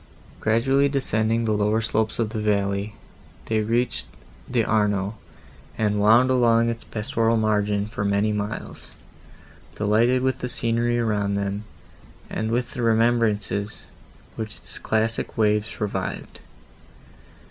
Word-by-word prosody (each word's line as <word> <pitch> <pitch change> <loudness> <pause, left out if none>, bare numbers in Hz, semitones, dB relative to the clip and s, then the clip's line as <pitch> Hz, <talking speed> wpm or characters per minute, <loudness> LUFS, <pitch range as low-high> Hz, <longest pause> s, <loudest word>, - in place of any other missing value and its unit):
Gradually 135 +6 +2
descending 115 -4 +1
the 110 - +1
lower 105 +1 +2
slopes 110 0 -1
of 110 -2 -1
the 110 -2 -3
valley, 100 0 0 0.5
they 110 -1 0
reached 115 +3 -1 0.4
the 120 -3 +1
Arno, 105 -2 +1 0.6
and 105 -1 +1
wound 115 +5 +5
along 115 -2 +4
its 115 -1 -4
pastoral 115 0 0
margin, 105 -2 +1
for 105 -1 -4
many 100 +1 +1
miles, 105 +1 -5 0.9
delighted 115 +5 +2
with 130 0 0
the 125 - -3
scenery 120 0 0
around 105 -4 0
them, 100 +1 -2 0.7
and 110 0 -2
with 120 +2 -1
the 125 - -4
remembrances, 110 -3 +1 0.5
which 110 0 -5
its - - -8
classic 110 +1 -1
waves 105 0 +1
revived. 105 -2 -4
110 Hz, 125 wpm, -24 LUFS, 105-115 Hz, 0.9 s, wound